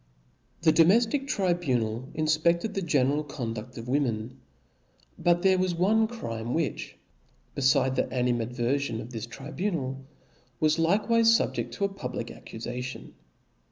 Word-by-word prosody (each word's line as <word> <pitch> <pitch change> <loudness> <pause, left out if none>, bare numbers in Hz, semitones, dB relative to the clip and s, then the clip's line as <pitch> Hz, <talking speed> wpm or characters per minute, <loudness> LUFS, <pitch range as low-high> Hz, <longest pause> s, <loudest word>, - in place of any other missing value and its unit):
The 160 - +6
domeflic 230 - +4
tribunal 135 - 0
infpefted 165 +6 +1
the 195 - -2
general 145 -3 +1
con 130 -6 -4
dud: 120 +3 -8
of 115 +1 -7
women: 125 -3 -1 0.8
but 175 0 +2
there 190 -1 +4
was 185 -2 0
one 215 +6 +3
crime, 115 - -4
which 160 -3 -3 0.6
befidc 130 -1 +3
the - - +2
animadverfion 125 +1 -1
of 115 +2 -8
this 115 -1 -5
tribunal, 135 0 -4 0.6
was 155 +1 +2
like 185 +6 +2
wife 230 -1 +4
fubjeft 230 0 +2
to 200 - 0
a - - 0
public 125 -9 -5
accufation. 125 +3 -7
145 Hz, 130 wpm, -27 LUFS, 125-180 Hz, 0.8 s, The